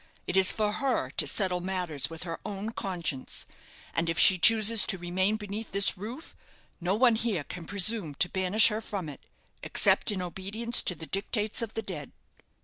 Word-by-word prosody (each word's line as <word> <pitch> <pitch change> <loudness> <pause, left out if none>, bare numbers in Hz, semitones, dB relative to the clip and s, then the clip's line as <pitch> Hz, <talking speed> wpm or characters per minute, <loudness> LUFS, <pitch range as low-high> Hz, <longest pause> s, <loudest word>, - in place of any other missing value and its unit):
It 180 - -4
is 190 -1 +5
for 210 -1 -1
her 240 - -2
to 150 - +1
settle 180 +2 -1
matters 175 -7 -2
with 165 +1 -8
her 165 -2 -6
own 205 +2 -6
conscience; 170 - -4 0.5
and 165 0 -1
if 165 - -3
she 185 +1 +5
chooses 220 +3 +5
to 190 - -1
remain 185 +4 -1
beneath 210 0 -7
this 200 0 +5
roof, 225 - -9 0.4
no 180 +2 -1
one 240 +1 +4
here 215 -9 -2
can 175 +3 -9
presume 200 -5 +1
to 180 - +1
banish 190 +5 +4
her 215 0 -4
from 200 -6 -6
it, 145 -3 -10 0.4
except - - +2
in 200 - -3
obedience 200 +7 0
to 180 - +1
the 160 - -9
dictates 210 +4 0
of 225 -2 -6
the 225 - -4
dead." 155 -9 -8
190 Hz, 185 wpm, -27 LUFS, 175-215 Hz, 0.5 s, is